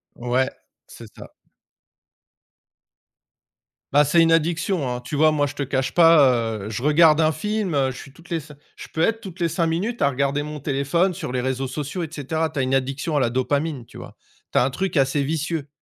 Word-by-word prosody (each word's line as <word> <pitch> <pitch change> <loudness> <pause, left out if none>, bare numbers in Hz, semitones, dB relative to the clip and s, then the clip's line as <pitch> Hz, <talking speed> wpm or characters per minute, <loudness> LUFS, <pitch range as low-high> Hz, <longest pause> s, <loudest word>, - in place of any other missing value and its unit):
Ouais, 125 +2 0 0.4
c'est - - -12
ça. - - -12 2.6
Bah, 145 +1 +6
c'est 170 +2 +4
une 165 - +3
addiction, 165 -2 +1
hein. 125 0 -4
Tu 135 +4 -6
vois, 155 +1 +4
moi, 145 -1 +1
je 145 - -5
te 145 - -6
cache 135 -1 -1
pas, 135 -9 +5
heu, - - -5
je 105 - -4
regarde 155 +2 +5
un 155 0 +3
film, 205 +1 -2
heu, 135 -1 +1
je 125 - -10
suis 135 - -11
toutes 170 +4 -19
les 165 - 0
cin 150 -1 -13 0.2
je - - -10
peux 160 - -2
être 225 +4 +1
toutes 190 -2 -10
les 170 - +1
5 165 0 0
minutes 200 +9 -2
à 140 - +4
regarder 140 +2 -1
mon 150 0 -6
téléphone 145 +7 0
sur 155 -7 -6
les 125 -1 -1
réseaux 130 +1 -2
sociaux, 150 +6 -5
et - - -3
cetera. 160 +2 -2
Tu 145 - -11
as 135 - +1
une 130 +1 -1
addiction 135 +4 -1
à - - +3
la 120 -3 +1
dopamine, 140 +1 -1
tu - - -14
vois. - - -11 0.4
Tu - - -1
as - - +5
un 135 - -1
truc 185 0 -2
assez 135 +1 +2
vicieux. 155 0 -2
150 Hz, 220 wpm, -22 LUFS, 135-165 Hz, 2.6 s, Bah